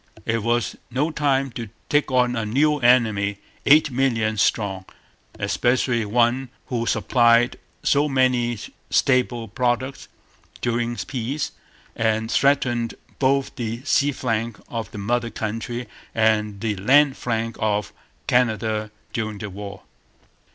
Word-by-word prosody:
It 115 0 0
was 120 -2 0
no 140 +6 0
time 135 -3 +1
to 115 -2 -6 0.2
take 145 -1 +2
on 125 -1 +2
a 115 - -1
new 145 +7 +2
enemy, 110 -5 +3 0.3
eight 150 0 +6
millions 115 -5 +1
strong, 95 -4 0 0.5
especially 120 -2 +1
one 120 +4 +1 0.2
who 115 -2 -1
supplied 120 0 +3 0.2
so 145 +1 +3
many 125 -3 +2 0.3
staple 125 -3 +2
products 125 +4 -1 0.5
during 120 0 -1
peace 130 +4 -3 0.4
and 110 0 0
threatened 120 -4 +2 0.2
both 135 0 +1
the 115 +1 -4
sea 145 +1 +2
flank 115 -4 -2
of 115 -3 -4
the - - -10
mother 120 +3 -1
country 115 +2 -4 0.3
and 105 -2 +1
the 110 -2 -1
land 135 +7 +4
flank 115 -1 -2
of 105 -1 0 0.3
Canada 110 -3 +1 0.2
during 110 -2 -3 0.2
war. 100 0 -8
120 Hz, 120 wpm, -23 LUFS, 110-130 Hz, 0.5 s, eight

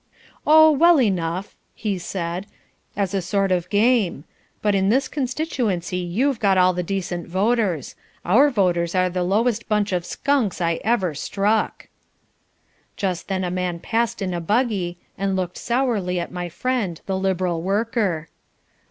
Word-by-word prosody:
"Oh, 315 +1 +8
well 335 +2 +5
enough!" 185 -4 -1 0.2
he 205 -4 -2
said, 175 +1 -4 0.5
"as 200 -2 -1
a 195 - 0
sort 195 +2 0
of 180 -1 0
game. 205 - +2 0.4
But 210 -1 +2
in 195 0 +2
this 265 +5 +2
constituency 245 - -2
you've 225 +9 0
got 195 -3 +3
all 185 0 +5
the 180 - -2
decent 180 -1 -3
voters; 190 - 0 0.3
our 255 +11 +5
voters 180 -7 +1
are 185 0 +2
the 180 0 -2
lowest 220 +6 0
bunch 210 -1 +1
of 180 -2 0
skunks 260 -2 0
I 170 -1 0
ever 200 -7 +1
struck." 205 +8 -1 1.1
Just 180 -4 -2
then 190 -1 -1
a 180 - -2
man 180 -1 -2
passed 225 +3 -1
in 185 -1 -2
a 175 - -2
buggy, 200 -3 0 0.2
and 195 -1 0
looked 180 -2 -3
sourly 230 -8 0
at 170 - -5
my 175 -1 -4
friend 195 -2 -2
the 190 - -2
Liberal 185 -3 0
worker. 195 -4 -1
195 Hz, 150 wpm, -22 LUFS, 180-225 Hz, 1.1 s, Oh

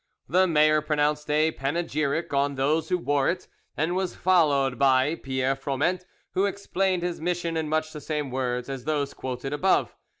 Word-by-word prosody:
The 185 +6 +3
mayor 155 -2 +4
pronounced 150 0 0
a 155 +2 +3
panegyric 155 +1 -2
on 140 0 +1
those 150 +4 0
who 180 - +2
wore 145 -5 +1
it, 180 +1 -3 0.3
and 165 +4 0
was 190 -1 -2
followed 145 -8 +2
by 135 +2 +4
Pierre 130 -3 -1
Froment, 145 +7 -1 0.3
who 195 +2 +2
explained 190 -2 -1
his 175 -2 -3
mission 170 -1 -1
in 160 -1 -1
much 155 0 -1
the 150 - -7
same 150 -2 -3
words 125 -1 -2
as 135 -2 -6
those 145 -2 -1
quoted 130 +2 -5
above. 185 +6 +1
150 Hz, 170 wpm, -26 LUFS, 135-170 Hz, 0.3 s, mayor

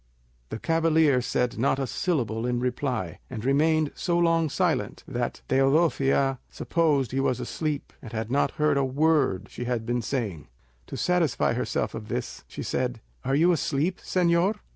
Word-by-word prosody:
The - - -4
cavalier 160 -2 +3
said 125 -1 -1
not 135 +2 +2
a 135 - -1
syllable 120 - -1
in 120 -1 0
reply, 125 - -2
and 120 -2 -6
remained 155 +2 +3
so 175 -2 -1
long 165 -2 +3
silent 175 +2 -1
that 120 -2 -3
Teodosia 135 -1 +2
supposed 150 -8 +1
he 135 - -1
was 130 -2 +1
asleep 150 -3 -3
and 115 - -9
had 110 0 -4
not 140 - +2
heard 150 -2 +2
a 140 - +2
word 140 - +2
she 120 - -5
had 120 -2 -2
been 120 +1 0
saying. 105 - -3 0.4
To - - -6
satisfy 170 -10 +1
herself 110 -2 -1
of 110 -1 -7
this, - - -4
she - - -7
said, 125 -2 -2 0.2
"Are 135 +1 +1
you 170 +5 +5
asleep, 160 +2 0
señor? 180 +3 +2
135 Hz, 165 wpm, -26 LUFS, 120-160 Hz, 0.4 s, you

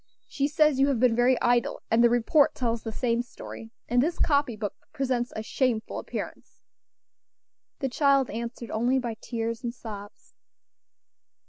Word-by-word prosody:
She 280 0 0
says 300 -2 +3
you 275 - +5
have 270 -5 +1
been 245 -2 +4
very 245 +1 +3
idle; 240 -1 +1
and 230 +1 +5
the 235 - +6
report 245 +5 +3
tells 235 -2 -1
the 225 - -5
same 235 +1 0
story; 230 -2 -10 0.2
and 245 +1 +3
this 330 +5 0
copy 280 -6 +2
book 210 -2 -4 0.2
presents 260 -4 -1
a 220 - -3
shameful 235 -1 -1
appearance." - - -7 1.2
The 270 - 0
child 275 0 +3
answered 235 +1 -5
only 245 +4 +2
by 240 -3 -2
tears 230 0 -3
and 240 - -2
sobs. 205 -3 -10
240 Hz, 155 wpm, -27 LUFS, 230-270 Hz, 1.2 s, the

